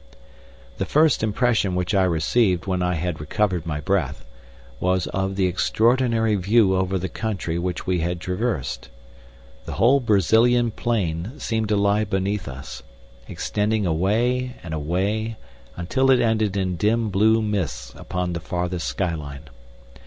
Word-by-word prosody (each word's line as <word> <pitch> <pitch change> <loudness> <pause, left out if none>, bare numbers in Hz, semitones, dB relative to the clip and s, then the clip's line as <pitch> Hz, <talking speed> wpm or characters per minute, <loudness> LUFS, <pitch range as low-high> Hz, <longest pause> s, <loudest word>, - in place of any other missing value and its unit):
The - - 0
first 155 -1 +3
impression 110 -3 +1
which 90 +3 -1
I 95 -2 +4
received 90 +2 +1
when 95 -2 -1
I 90 0 0
had 85 0 -3
recovered 85 +2 -1
my 75 -2 -2
breath 85 -6 -1 0.5
was 90 0 +1
of 95 0 -2
the 95 -1 +1
extraordinary 115 +4 +2
view 100 0 +3
over 95 0 0
the 95 +1 -3
country 95 -6 -3
which 90 0 -3
we 90 -1 0
had 85 +1 -2
traversed. 90 - -3 0.8
The - - -5
whole 130 +5 +4
Brazilian 115 +2 +3
plain 105 - -2
seemed 110 -4 -2
to 105 - +2
lie 100 +1 +2
beneath 95 -1 -2
us, 65 0 -8 0.5
extending 105 0 -1
away 115 +9 0
and 80 -2 -6
away 100 +9 -1 0.4
until 110 +10 +1
it 130 -2 +5
ended 110 -4 +1
in 95 -2 -1
dim 110 +3 +1
blue 110 +4 +4
mists 100 -7 -3
upon 90 -1 -3
the 85 - -3
farthest 90 +1 -3
sky 90 -4 -1
line. 70 -2 -8
95 Hz, 145 wpm, -23 LUFS, 90-110 Hz, 0.8 s, it